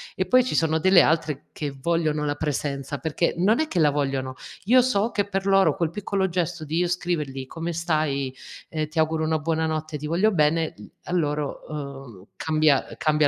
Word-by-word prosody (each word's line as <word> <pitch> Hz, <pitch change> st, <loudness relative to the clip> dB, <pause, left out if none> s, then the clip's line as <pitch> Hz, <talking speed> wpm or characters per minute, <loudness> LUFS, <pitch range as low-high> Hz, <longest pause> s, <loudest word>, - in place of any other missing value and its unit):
E 185 Hz, -, 0 dB
poi 255 Hz, +7 st, +5 dB
ci 255 Hz, -, -2 dB
sono 160 Hz, 0 st, +2 dB
delle 185 Hz, 0 st, +6 dB
altre 155 Hz, -3 st, 0 dB
che 150 Hz, -, -4 dB
vogliono 155 Hz, -1 st, 0 dB
la 145 Hz, -, 0 dB
presenza 145 Hz, -2 st, -3 dB
perché 160 Hz, +5 st, -1 dB
non 200 Hz, +6 st, +3 dB
è 315 Hz, -, +1 dB
che 190 Hz, -, -5 dB
la 150 Hz, -3 st, +4 dB
vogliono, 135 Hz, -2 st, -1 dB, 0.3 s
io 250 Hz, +6 st, +5 dB
so 235 Hz, -3 st, +1 dB
che 205 Hz, -1 st, 0 dB
per 195 Hz, -1 st, -2 dB
loro 195 Hz, -1 st, +4 dB
quel 170 Hz, -4 st, -1 dB
piccolo 195 Hz, 0 st, -1 dB
gesto 175 Hz, -2 st, -2 dB
di 155 Hz, +2 st, -2 dB
io 175 Hz, +1 st, +2 dB
scrivergli: 160 Hz, -7 st, -2 dB
"Come 165 Hz, +5 st, -5 dB
stai?" 155 Hz, -5 st, -1 dB, 0.3 s
e 155 Hz, -1 st, -2 dB
"Ti 155 Hz, -, -12 dB
auguro 160 Hz, 0 st, +1 dB
una 160 Hz, 0 st, +1 dB
buonanotte, 155 Hz, -1 st, -2 dB
ti 150 Hz, -, -5 dB
voglio 185 Hz, +7 st, +2 dB
bene", 160 Hz, -2 st, +2 dB
mhmm, 105 Hz, -, -12 dB, 0.2 s
a -, -, -8 dB
loro, 150 Hz, -4 st, -1 dB
ehm, 135 Hz, -9 st, -8 dB
cambia 155 Hz, -3 st, +2 dB
ehm, -, -, -10 dB
cambia 150 Hz, -1 st, +3 dB
160 Hz, 200 wpm, -24 LUFS, 150-175 Hz, 0.3 s, delle